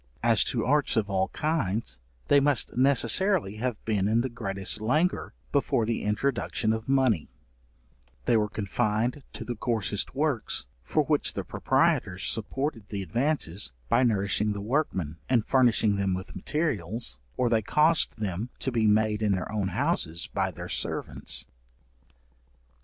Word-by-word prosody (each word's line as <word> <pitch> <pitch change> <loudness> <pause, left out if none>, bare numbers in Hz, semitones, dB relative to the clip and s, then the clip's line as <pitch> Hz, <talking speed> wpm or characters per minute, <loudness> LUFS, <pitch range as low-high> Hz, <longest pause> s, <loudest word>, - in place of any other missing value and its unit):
As 115 -2 +4
to 115 -3 -1
arts 145 -1 +2
of 105 -2 0
all 95 0 +1
kinds, 115 - -1 0.3
they 145 - +6
must 140 -1 +2
necessarily 135 - +3
have 120 -1 -2
been 105 -3 +1
in 115 +2 +3
the 130 - -2
greatest 100 -3 -1
languor 155 +11 0 0.2
before 135 -4 +1
the 115 0 -1
introduction 110 0 0
of 110 +3 -5
money; 130 - +2 1.0
they - - +3
were 105 -1 +2
confined 110 +5 -1
to - - -7
the 120 - -3
coarsest 105 -2 -2
works, 145 -5 0 0.2
for - - +1
which - - 0
the - - -3
proprietors 90 +1 +1
supported 115 0 -3
the 100 -2 -3
advances, 100 - -1 0.2
by 120 - +4
nourishing 105 -2 +1
the 100 - -5
workmen, 100 - -1
and 120 -4 +3
furnishing 115 -5 +3
them 95 -2 0
with 95 +1 -7
materials, 120 - -2 0.2
or 125 - +2
they 115 -2 +2
caused 150 +7 +2
them 105 +2 -3
to 130 - -2
be 115 -3 +2
made 105 0 +2
in 105 -2 +2
their 95 +1 -3
own 105 -3 -1
houses 85 0 +1
by 95 -1 0
their 90 0 -8
servants. - - -1
110 Hz, 150 wpm, -27 LUFS, 100-130 Hz, 1.0 s, they